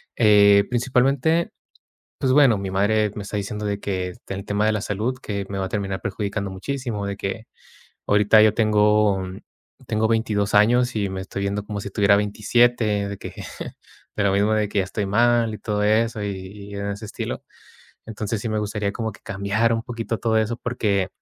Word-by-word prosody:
eh, 100 -2 +6
principalmente, 130 +6 +1 0.7
pues 130 -1 +2
bueno, 135 -7 +5
mi 95 -1 -4
madre 105 +2 +1
me 105 - -5
está 105 +1 -4
diciendo 105 +1 -4
de 100 0 -2
que 95 -3 -3
el 100 0 -5
tema 105 +1 0
de 110 - +2
la 105 - -1
salud, 110 +6 -2
que 100 -2 -3
me 100 - -4
va 95 - -1
a - - -5
terminar 100 -2 -3
perjudicando 100 -1 -3
muchísimo, 115 0 -4
de 100 0 -3
que 105 +3 -5 0.6
ahorita 105 +1 +5
yo 110 - +5
tengo 105 -2 +3 0.6
tengo 110 +1 +1
22 105 -3 0
años 120 +3 +4
y 100 -2 0
me 95 0 -5
estoy 100 +1 -5
viendo 100 +1 -2
como 105 -1 -5
si 100 - -5
tuviera 100 0 +4
27 105 0 +2
de 100 - -5
que - - -8 0.8
de 105 - +1
lo 100 - +3
mismo 100 +2 +2
de 105 -1 +1
que 100 -1 0
estoy 100 +2 -2
mal 115 +1 +2
y - - -7
todo 105 -1 -1
eso 110 +1 +2
y 100 - -2 0.4
y - - -7
en 100 0 -3
ese 100 +2 -5
estilo. - - -5 0.6
Entonces 110 0 -4
sí 115 - -3
me 110 0 -1
gustaría 105 -1 -2
como 110 +1 -3
que - - -17
cambiar 100 +4 0
un 115 0 -2
poquito 115 -2 -4
todo 115 -1 0
eso 110 +2 0
porque 100 -6 0
105 Hz, 190 wpm, -23 LUFS, 100-115 Hz, 0.8 s, eh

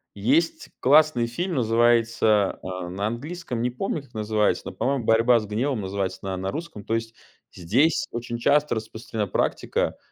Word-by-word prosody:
Есть 140 +12 +1
классный 145 -3 +5
фильм, 175 +10 -3
называется, 115 -3 +2
а, 90 -1 -5
на 100 +3 -2
английском 130 +2 -5
не 125 - +1
помню, 145 +3 -3
как 130 -3 -22
называется, 105 -1 0
но, - - -5
по-моему, 135 -3 -1
"Борьба 115 +2 +4
с 110 - -6
гневом" 115 +4 -1
называется 95 -1 -3
на 95 -1 -3
на 95 +1 -3
русском. 160 -9 -7
То 115 - -1
есть 115 0 -4 0.4
здесь 135 - +1
очень 120 0 -4
часто 145 +3 +2
распространена 110 -1 -4
практика, - - -1
115 Hz, 160 wpm, -24 LUFS, 105-135 Hz, 0.4 s, классный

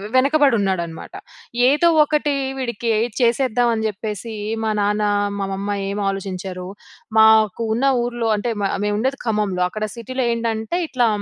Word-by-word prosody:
వెనకబడి 275 -1 +4
ఉన్నాడనమాట. 170 -4 -3 0.6
ఏదో 300 +5 +3 0.2
ఒకటి 295 -1 0 0.3
వీడికి 235 -2 -2 0.3
చేసేద్దాం, 240 0 +2
అని 220 0 -2
చెప్పేసి 215 +1 -6 0.3
మా 220 - 0
నాన్న 210 +1 +1 0.4
మా 195 - -1
మమ్మా 200 +1 -3 0.2
ఏం 200 +1 -3
ఆలోచించారు? 185 -1 -5 0.5
మాకు 220 0 +5
ఉన్న 260 +4 0 0.2
ఊర్లో 240 -1 -2
అంటే, 235 +4 -2
మా 195 - +2 0.2
మేము 205 - 0
ఉండేది 265 +3 -1
ఖమ్మంలో. 210 -5 0
అక్కడ 215 +3 -5
సిటీలో 255 +2 -3
ఏంటంటే, 230 +3 -2
ఇట్లా 245 -4 +1
220 Hz, 140 wpm, -20 LUFS, 200-245 Hz, 0.6 s, మాకు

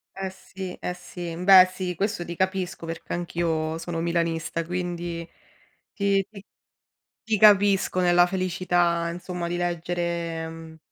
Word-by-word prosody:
Eh 190 0 -3
sì, 190 0 -8
eh 180 - -4
sì. 175 -1 -7
Beh, 185 -1 +8
sì, 180 -2 -3
questo 200 -1 -2
ti 170 0 -6
capisco 185 -2 -2
perché 165 0 -6
anch'io 165 -2 -1
sono 165 0 -4
milanista, 165 -1 -1
quindi 175 -1 -4 0.7
ti 200 -1 +2
ti 200 -2 -12 0.8
ti 220 -1 0
capisco 200 -3 +5
nella 175 0 +5
felicità, 175 -2 0
insomma, 175 0 -5
di 175 +1 -2
leggere, 170 -1 -2
mhmm 160 -1 -11
175 Hz, 130 wpm, -25 LUFS, 170-185 Hz, 0.8 s, Beh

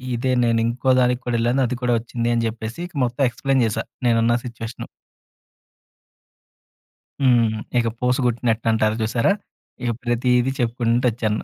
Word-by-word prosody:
ఇదే 130 +2 -1
నేనింకోదానికి 125 +2 +2
కూడా 120 -1 -1
ఎళ్ళాను, 120 +4 +1
అది 125 - -3
కూడా 125 -1 +1
ఒచ్చింది" 115 0 -3
అని 115 0 +1
చెప్పేసి, 110 +3 -6
ఇక 180 - -24
మొత్తం 125 +4 -2
ఎక్స్‌ప్లెయిన్ 135 +1 0
జేశా 110 +1 -1 0.2
నేనున్న 115 0 +3
సిచ్యువేషను. 115 -1 -7 2.4
హ్మ్. 115 -4 +4 0.2
ఇక 115 -1 +2
పూస 125 0 +2
గుట్టినట్టు 115 -1 0
అంటారు 110 -1 +1
చూసారా! 115 - +1 0.5
ఇక 120 - +1
ప్రతీదీ 125 +1 +2
చెప్పుకుంటూ 120 0 +1
ఒచ్చాను. 110 -1 -2
120 Hz, 130 wpm, -22 LUFS, 115-125 Hz, 2.4 s, హ్మ్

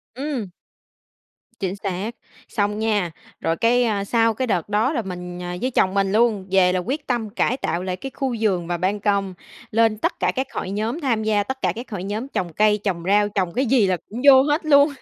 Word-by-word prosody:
Ừm. 265 -8 -3 1.1
Chính 190 -1 -2
xác. 200 +3 -4 0.3
Xong 210 -1 -1
nha. 205 -6 0 0.3
Rồi 165 0 0
cái 230 -3 +2
sau 230 +1 +2
cái 255 +3 -2
đợt 180 -4 -1
đó, 220 +8 +1
là 240 - 0
mình 180 -2 -7 0.2
với 255 - 0
chồng 190 -5 +2
mình 195 -1 +1
luôn, 215 -3 +2
về 185 -1 +4
là 185 - +1
quyết 280 - -4
tâm 235 -4 -1
cải 245 +5 0
tạo 175 -8 -2
lại 185 -1 -2
cái 265 +8 -7
khu 260 -3 -1
vườn 185 -6 0
và 175 - -1
ban 190 +4 0
công, 200 -2 0 0.4
lên 225 -1 +3
tất 335 - -2
cả - - +2
các 265 +1 -1
hội 185 - -4
nhóm, 220 - -2
tham 230 -6 0
gia 210 -2 +2
tất 265 +5 -5
cả - - +1
các 235 +1 -8
hội 185 -3 -4
nhóm 210 +6 -3
trồng 175 - -3
cây, 210 0 +3
trồng 175 -5 -2
rau, 205 +1 +4
trồng 185 -4 -1
cái 265 +2 +1
gì 230 -5 +3
là 185 -1 +1
cũng 230 +4 -6
vô 265 -1 +9
hết 300 +3 0
luôn. 285 0 +5
210 Hz, 220 wpm, -22 LUFS, 190-245 Hz, 1.1 s, vô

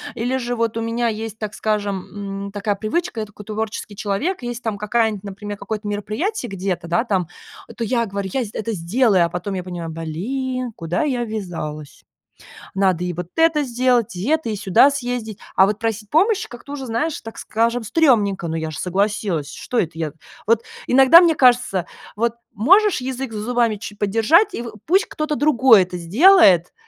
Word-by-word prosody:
Или 245 +3 -1
же 245 -1 -3
вот 230 -1 -1
у - - -1
меня 230 +1 -1
есть, 220 0 -5
так 215 -1 -4
скажем, 200 -1 -3
м, - - -9
такая 205 0 -2
привычка, 225 - -2
я - - -3
такой 210 0 -13
творческий 215 -1 -4
человек, 245 - -2
и - - -3
если 240 0 -5
там 220 -3 -3
какая-нибудь, 210 -1 0
например, 205 +1 -6
там - - -33
какое-нибудь 215 -1 -4
мероприятие 240 - -3
где-то, 185 -3 -3
да 200 +8 +1
там, 190 -8 -1 0.5
то 230 - -3
я 235 0 0
говорю: 200 -1 -4
"Я 260 - 0
сд 205 - -11
я - - -5
это 225 +1 -3
сделаю", 190 +1 +2
а 170 - -3
потом 180 +3 -4
я 185 -1 -3
понимаю, 175 -2 -6
блин, 245 +11 -3
куда 165 - -2
я 255 -5 -1
ввязалась. 170 -9 -6 0.7
Надо 190 -3 +1
и 180 - -2
вот 175 0 -5
это 325 -2 +3
сделать, 245 -5 +1
и 185 +7 -4
это, 315 -7 +1
и 215 - -2
сюда 195 +7 +4
съездить, 245 -6 -4 0.2
а 190 - +6
вот 210 0 -1
просить 225 -2 -3
помощи 390 +6 +2
как-то 245 +4 -11
уже, 270 -2 -5
знаешь, 295 +8 -1
так 225 - -10
скажем, 230 +2 0
стрёмненько, 210 - +2
ну 160 - -3
я 160 -1 -3
же 155 - -7
согласилась, 185 -5 -1
что 245 - -5
это 170 -6 +1
я? 155 -3 -3 0.3
Вот 230 0 +3 0.2
иногда 270 +7 +8
мне 330 -3 +4
кажется, 245 - +3 0.3
вот 230 +1 0 0.2
можешь 370 - +4
язык 260 -1 -4
за 210 - -4
зубами 235 -1 +1
ч 210 0 -8
подержать, 225 - +3
и 235 - -4
в 230 - -7
пусть 380 +6 +3
кто-то 305 -1 -3
другой 255 -7 +5
это 180 0 -7
сделает, 195 - +5
220 Hz, 195 wpm, -21 LUFS, 195-250 Hz, 0.7 s, иногда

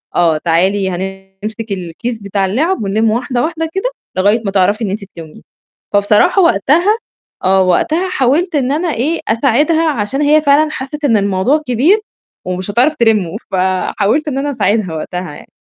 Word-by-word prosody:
آه 165 -3 +3
تعالي 190 +4 +1
هنمسِك 195 +4 -6
الكيس 195 +6 -4
بتاع 200 -1 -1
الِلعَب، 275 - 0
ونلِّم 215 +3 +1
واحدة، 245 +2 -1
واحدة 325 0 -2
كده، 385 +6 -1 0.3
لغاية 205 +5 +3
ما 195 - -1
تعرفي 205 +4 +1
إن 205 - -1
أنتِ 200 +2 -4
تلِّمّيهم، 160 -2 -11 0.5
فبصراحة 210 - +3
وقتها 340 - +3 0.5
آه، 190 0 +3
وقتها 310 - +1
حاولت 315 +4 +1
إن 270 -2 +1
أنا 320 +5 -1
إيه، 290 +9 -1
أساعدها 290 +8 +2
عشان 270 0 -2
هي 300 +1 +4
فعلًا 300 +1 +3
حسِّت 295 +2 -5
إن 230 -6 +3
الموضوع 200 +9 +1
كبير 275 - +3 0.5
ومش 185 +2 -3
هتعرف 255 +9 +2
تلِمُّه، 215 - +1 0.2
فحاولت 190 +8 0
إن 275 -3 -2
أنا 285 +1 -1
أساعدها 205 -7 0
وقتها 180 +1 -5
يعني. - - -13
225 Hz, 160 wpm, -15 LUFS, 195-295 Hz, 0.5 s, هي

